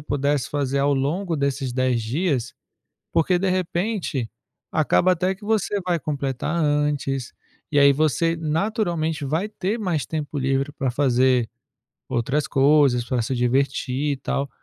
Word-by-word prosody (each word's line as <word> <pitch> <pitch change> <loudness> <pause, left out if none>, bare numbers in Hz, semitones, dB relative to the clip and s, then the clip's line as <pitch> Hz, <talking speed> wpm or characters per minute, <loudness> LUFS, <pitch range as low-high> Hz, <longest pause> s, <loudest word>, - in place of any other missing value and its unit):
pudesse 145 -2 -1
fazer 140 -1 -1
ao 140 +1 +2
longo 160 +6 -1
desses 140 -2 -1
10 125 -2 +1
dias? 130 0 -1 0.6
Porque 175 +2 +2
de 195 +1 0
repente, 180 - -1 0.4
acaba 165 +4 +3
até 185 +2 0
que 205 - -14
você 210 -1 0
vai 175 -2 +1
completar 140 +1 -2
antes, 145 -3 0 0.4
e 145 - +2
aí 140 0 +7
você, 155 +3 +1
naturalmente, 165 - -1
vai 160 +9 -1
ter 210 +2 -2
mais 175 -8 -1
tempo 150 -2 -4
livre 135 +2 0
pra 135 -3 -2
fazer 125 -2 +2 0.6
outras 130 +4 0
coisas, 135 -3 +4
pra 125 -1 -1
se 130 +3 -2
divertir, 130 +3 0
e - - -2
tal. 140 +1 -2
145 Hz, 145 wpm, -23 LUFS, 135-165 Hz, 0.6 s, aí